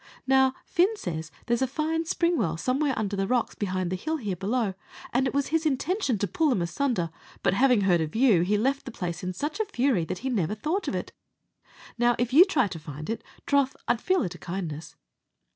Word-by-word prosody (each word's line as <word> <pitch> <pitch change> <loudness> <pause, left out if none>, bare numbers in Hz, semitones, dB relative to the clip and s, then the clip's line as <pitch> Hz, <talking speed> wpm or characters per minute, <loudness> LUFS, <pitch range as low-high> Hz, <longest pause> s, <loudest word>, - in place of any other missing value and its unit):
Now, 265 0 +4
Fin 385 +5 +2
says 160 - -4 0.2
there's 235 +1 +1
a 265 - +2
fine 320 +4 -1
spring 340 +1 +1
well 165 - 0
somewhere 265 - 0
under 205 -2 -1
the 195 0 -1
rocks 245 0 +1
behind 185 -3 -2
the - - 0
hill 315 - -2
here 205 -9 -3
below, 205 +3 -1 0.4
and 260 +2 +2
it - - -3
was 280 -1 +1
his 325 0 +1
intention 300 - 0
to 205 - -1
pull 310 - +1
them 200 -10 +1
asunder; 175 - -1 0.3
but - - +3
having 250 +1 +4
heard 180 -4 +3
of 155 +3 -3
you, 225 -7 +5
he 200 +4 +2
left 270 +6 0
the 255 - -6
place 175 -5 -4
in 185 - -2
such 295 - -4
a 435 - +1
fury, 260 - +1
that 185 +2 -4
he - - +1
never 205 -3 0
thought 315 - -2
of - - -1
it. - - -4 0.9
Now, 240 0 +4
if 245 +1 -1
you 335 +6 +9
try 350 - +2
to 165 - -6
find 155 +4 -6
it, 225 - -4 0.2
troth 280 -2 +2
I'd 235 - +1
feel 370 -3 +2
it 180 - -3
a 175 - -12
kindness." 170 -4 -5
240 Hz, 225 wpm, -27 LUFS, 185-280 Hz, 0.9 s, you